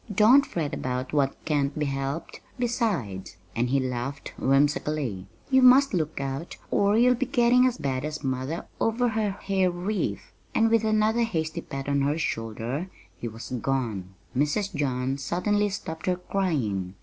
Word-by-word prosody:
"Don't 230 +8 +6
fret 155 -4 -3
about 130 +1 -3
what 140 -2 +2
can't 145 -2 0
be 150 - 0
helped; 135 +3 -4 0.2
besides" 210 - -2 0.2
and 120 +2 +1
he 140 +2 +3
laughed 130 +2 -4
whimsically 135 -6 +1 0.2
"you 265 0 +6
must 255 +1 +7
look 155 -4 -1
out 135 +4 -4
or 205 +1 +3
you'll 250 +2 +6
be 250 +1 -2
getting 250 0 +4
as 250 -1 -1
bad 130 -1 -2
as 155 0 -4
mother 130 +4 -2
over 235 +2 +2
her 220 -2 0
hair 190 -1 0
wreath!" 180 +4 -3 0.2
And 225 0 +4
with 230 -1 +4
another 215 +1 +2
hasty 160 -9 -1
pat 135 0 -6
on 140 0 +1
her 145 +3 +1
shoulder 120 - -3 0.3
he 105 +6 -5
was 115 +1 -8
gone. 110 -9 -2 0.2
Mrs. 170 +9 0
John 130 -1 -1
suddenly 205 +8 +1
stopped 160 -5 -6
her 180 - +3
crying. 135 - -1
155 Hz, 160 wpm, -26 LUFS, 135-210 Hz, 0.3 s, must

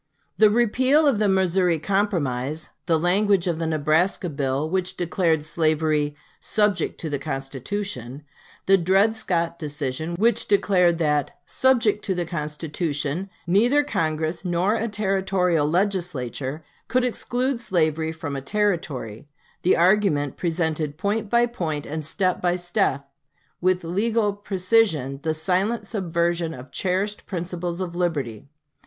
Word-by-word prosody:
The 215 - +7
repeal 255 +7 +3
of 250 -7 +2
the 210 -2 +2
Missouri 185 -2 +2
Compromise, 155 -7 -1 0.2
the 165 -2 +3
language 190 +3 +2
of 170 -3 -1
the 165 - -1
Nebraska 160 +4 +1
bill, 140 0 -1
which 185 +2 -1
declared 170 -3 +1
slavery 155 -2 +1 0.2
"subject 210 -5 0
to 160 - -3
the 145 - -1
Constitution," 135 - -5 0.4
the 195 0 +5
Dred 195 +5 +3
Scott 170 -5 -1
decision, 150 +1 -3
which 220 +4 +2
declared 180 -4 +3
that 150 -4 0
"subject 230 -5 +2
to 190 - 0
the 175 -1 -1
Constitution" 155 +1 -3 0.2
neither 235 +11 +3
Congress 160 - -2
nor 180 +3 +1
a 230 0 -1
Territorial 190 -6 +1
Legislature 160 - -2 0.2
could 250 +2 +1
exclude 250 +1 -1
slavery 160 -7 0
from 160 -3 -5
a 135 - -3
Territory 145 - -2 0.3
the 180 - +3
argument 170 -6 +3
presented 160 -3 -1
point 205 +3 -1
by 235 +1 +4
point 165 -11 -3
and 155 +1 -4
step 185 +4 0
by 175 0 +2
step 175 -5 -1 0.5
with 185 0 +2
legal 205 +4 +1
precision 185 - +1
the 160 0 -1
silent 195 +7 0
subversion 170 -4 -1
of 130 +1 -11
cherished 195 +3 -2
principles 175 -1 -4
of 175 -2 -4
liberty. 140 - -2
175 Hz, 130 wpm, -24 LUFS, 155-200 Hz, 0.5 s, The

